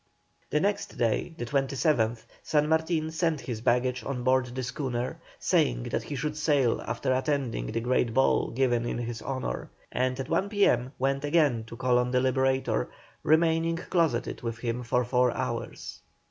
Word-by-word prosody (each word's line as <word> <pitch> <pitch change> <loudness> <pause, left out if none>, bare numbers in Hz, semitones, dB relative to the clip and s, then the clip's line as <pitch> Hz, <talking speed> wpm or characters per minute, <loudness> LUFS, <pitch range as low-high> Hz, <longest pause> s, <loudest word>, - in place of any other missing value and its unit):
The 150 - +2
next 200 +4 -1
day, 120 +8 0
the 120 - -3
27th, 135 -3 +1 0.2
San 150 -1 +1
Martin 160 0 +1
sent 160 -2 0
his 115 -4 -5
baggage 125 +1 +1
on 125 -3 -3
board 130 0 +3
the 130 +1 -5
schooner, 125 -1 -3 0.2
saying - - +1
that - - 0
he 145 - -6
should 150 +3 -2
sail 145 -6 +2
after 120 +3 -1
attending 135 -2 -1
the 115 +1 -2
great 120 -1 +1
ball 135 +4 +3
given 120 -2 +1
in 120 - -2
his 120 -1 -4
honour, 130 - -4 0.2
and 130 +1 0
at 135 - -3
one 195 - 0
P.M. 130 - +2
went 135 +1 0
again 145 -7 +2
to 115 - -9
call 125 0 +3
on 125 0 0
the 125 0 +2
Liberator, 130 - +1 0.3
remaining 165 +1 +3
closeted 165 -8 0
with 115 -2 -4
him 115 +1 -2
for 125 +1 +1
four 125 0 +3
hours. - - -4
130 Hz, 170 wpm, -28 LUFS, 120-150 Hz, 0.3 s, board